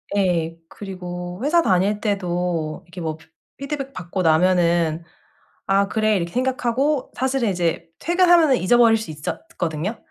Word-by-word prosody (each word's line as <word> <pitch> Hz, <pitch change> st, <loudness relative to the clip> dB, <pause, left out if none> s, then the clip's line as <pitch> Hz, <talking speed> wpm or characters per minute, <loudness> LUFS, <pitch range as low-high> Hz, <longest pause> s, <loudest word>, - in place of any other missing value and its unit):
예 170 Hz, -4 st, 0 dB
그리고 180 Hz, -1 st, -7 dB
회사 335 Hz, +4 st, +4 dB
다닐 200 Hz, -, +1 dB
때도 175 Hz, -6 st, -2 dB
이렇게 175 Hz, +1 st, -9 dB
뭐 160 Hz, -1 st, -3 dB, 0.4 s
피드백 275 Hz, -1 st, -5 dB
받고 185 Hz, -1 st, -4 dB
나면은 170 Hz, -1 st, +2 dB, 0.6 s
'아 195 Hz, +1 st, +2 dB
그래.' 215 Hz, -1 st, +1 dB
이렇게 170 Hz, -2 st, -3 dB
생각하고 260 Hz, +2 st, 0 dB
사실은 265 Hz, -2 st, 0 dB
이제 175 Hz, -3 st, -1 dB
퇴근하면은 345 Hz, -5 st, +4 dB
잊어버릴 230 Hz, +3 st, +4 dB
수 220 Hz, -, -7 dB
있었거든요. 165 Hz, -, -4 dB
190 Hz, 310 characters per minute, -22 LUFS, 175-250 Hz, 0.6 s, 회사